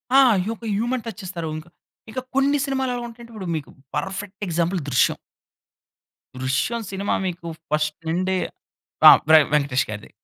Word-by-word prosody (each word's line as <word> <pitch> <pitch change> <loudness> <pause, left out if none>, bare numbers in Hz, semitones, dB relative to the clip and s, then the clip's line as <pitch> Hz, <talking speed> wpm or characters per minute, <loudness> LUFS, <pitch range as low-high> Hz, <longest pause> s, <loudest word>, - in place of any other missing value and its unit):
ఆ! - - +9 0.3
యొక 230 0 -6
human 240 +2 -1
touch 225 -2 -7
ఇస్తారు. 170 -3 -4
ఇంకా. 155 +2 -10 0.4
ఇక 255 - -3 0.2
కొన్ని 275 +2 +3
సినిమాలు 265 -2 -1
ఎలా 240 - -4
ఉంటాయి 235 0 -12
అంటే 235 - -14
ఇప్పుడు 200 -4 -6
మీకు 150 - -8 0.3
పర్ఫెక్ట్ 195 +1 -4
ఎగ్జాంపుల్ 175 +2 0
'దృశ్యం.' 125 - +3 1.2
'దృశ్యం' 135 - -1
సినిమా 195 +1 -1
మీకు 175 -2 -4 0.2
ఫస్ట్ 150 0 +1
నుండీ 185 +3 0 0.7
ఆహ్, - - +10
వె 160 - +10
వెంకటేష్ 140 -3 +2
గారిది. 105 0 -7
190 Hz, 150 wpm, -23 LUFS, 155-235 Hz, 1.2 s, ఆహ్